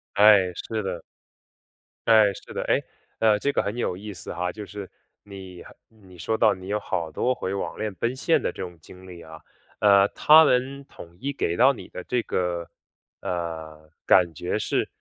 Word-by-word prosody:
哎， 100 -3 +6
是 110 -1 -4
的。 85 -4 -4 1.1
哎， 110 -3 +6
是 - - -12
的， - - -3
哎， - - +3 0.4
呃， 110 -2 +3
这 140 - 0
个 - - 0
很 105 +3 -3
有 90 - -2
意 105 +1 -8
思 90 - -8
哈。 90 0 -2
就 105 +1 -8
是 100 -1 -8 0.4
你 95 -3 -11
很 - - -15
你 95 -6 -18
说 110 +6 -1
到 110 -3 +4
你 95 0 -10
有 105 +1 -1
好 85 -5 -3
多 125 +11 0
回 95 - -4
网 100 - -5
恋 105 -1 -3
奔 120 +6 -2
现 165 +5 +2
的 - - 0
这 - - -9
种 90 -2 -7
经 90 +3 -15
历 85 -2 -11
啊。 80 -1 -12 0.4
呃， 100 -1 +5
他 155 +1 +6
们 135 +2 0
统 85 -9 -14
一 140 +1 -3
给 85 -10 -2
到 135 +2 +6
你 - - -10
的 90 - -8
这 125 +4 -1
个， 90 -3 -2 0.5
呃， 80 -3 -5 0.2
感 90 -3 +5
觉 - - -2
是， - - -1
100 Hz, 210 characters per minute, -25 LUFS, 90-110 Hz, 1.1 s, 哎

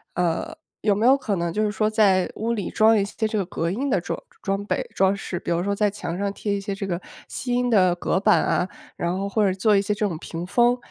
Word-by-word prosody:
呃， 180 - -1 0.3
有 205 -2 +2
没 220 +3 0
有 270 +2 +6
可 215 -7 -2
能 170 -2 -1
就 215 - -1
是 210 - +1
说 215 0 +1
在 200 -4 +3
屋 230 +2 -1
里 205 -5 -3
装 220 +1 +4
一 200 - +2
些 215 +2 -2
这 215 - -2
个 195 - 0
隔 165 -2 -2
音 260 +10 -2
的 195 - +2
装 175 - -4 0.2
装 195 0 -1
备、 - - -2
装 190 0 +3
饰？ 190 -2 -5
比 - - -4
如 170 +1 +1
说 200 +1 0
在 210 0 +2
墙 180 -4 -5
上 200 0 -1
贴 205 0 -3
一 200 - -3
些 200 0 -3
这 195 0 -4
个 175 0 -2 0.3
吸 245 -2 -4
音 245 0 +1
的 185 -6 +4
隔 180 - 0
板 - - +4
啊， 180 - 0 0.3
然 175 +2 -2
后 200 +1 -2
或 210 +1 +1
者 190 - +2
做 210 +2 +3
一 195 - +4
些 205 +1 -1
这 210 0 0
种 170 -5 -4
屏 165 +2 -6
风， 240 +5 +3
200 Hz, 290 characters per minute, -24 LUFS, 185-215 Hz, 0.3 s, 有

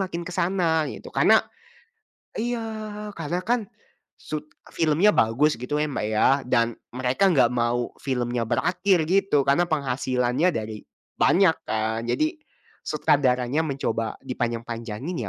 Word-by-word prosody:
makin 185 -3 -3
ke 180 - -7
sana, 170 -3 +1
gitu. - - -8
Karena - - +5 1.0
iya, 235 0 -2 0.6
karena 165 +2 -2
kan, 235 -1 +1 0.5
sut 150 0 -6 0.2
filmnya 165 +6 +3
bagus 135 +8 +3
gitu 125 +5 -3
ya 155 - 0
Mbak 105 -6 -2
ya, 110 - +3 0.2
dan, 115 -2 +1 0.2
mereka 130 +10 +2
enggak 135 -6 +5
mau 120 0 0
filmnya 120 -3 -1
berakhir 180 - +1
gitu, 190 -6 +3
karena 140 +5 +4
penghasilannya 130 0 0
dari 110 -2 -5 0.4
banyak 185 -3 +4
kan. 110 +1 -1
Jadi, 310 - 0 0.5
sutradaranya 130 +1 +1
mencoba 115 -6 -2
dipanjang-panjangin 120 - -4
140 Hz, 120 wpm, -24 LUFS, 120-175 Hz, 1.0 s, Karena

